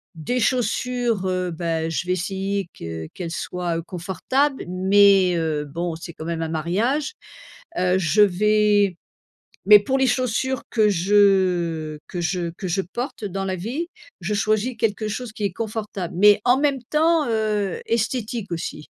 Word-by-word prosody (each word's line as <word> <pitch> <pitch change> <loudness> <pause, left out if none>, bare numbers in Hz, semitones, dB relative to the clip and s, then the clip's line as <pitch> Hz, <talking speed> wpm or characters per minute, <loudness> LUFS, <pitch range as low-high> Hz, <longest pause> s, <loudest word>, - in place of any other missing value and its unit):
des 245 +11 -2
chaussures, 245 -2 0
heu, 185 -1 -1
bah, 165 -1 -2
je 165 +2 -2
vais 180 - -1
essayer 195 +1 -2
que 80 -1 -6
qu'elles 170 -2 -5
soient, 175 0 -3
heu, - - -2
confortables 195 - -1
mais, 190 0 +4
heu, 155 -2 -1
bon, 170 +3 -4
c'est 170 +1 -8
quand 160 - -9
même 165 -1 -3
un 160 - -2
mariage. 210 - -1 0.7
Heu, 180 0 +2
je 190 +4 +3
vais 205 -1 +3 0.7
mais 210 +1 +10
pour 265 +6 0
les 265 - +3
chaussures 255 +1 0
que 215 -3 +3
je 180 -5 +2
que 180 - -4
je 175 0 -1
que 190 - -5
je 180 +3 0
porte, 240 +5 -6
heu, - - -2
dans 195 +1 -3
la 190 -1 -2
vie, 250 - -4 0.3
je 185 +5 -2
choisis 215 +4 0
quelque 215 -1 0
chose 230 +2 -5
qui 210 - -4
est 200 - 0
confortable, 210 -3 -4
mais 205 +1 +6
en 250 +1 +5
même 280 -3 +1
temps, 320 0 +3
heu, 215 -4 -1
esthétique 230 -2 -2
aussi. 165 -2 -5
200 Hz, 165 wpm, -22 LUFS, 175-225 Hz, 0.7 s, mais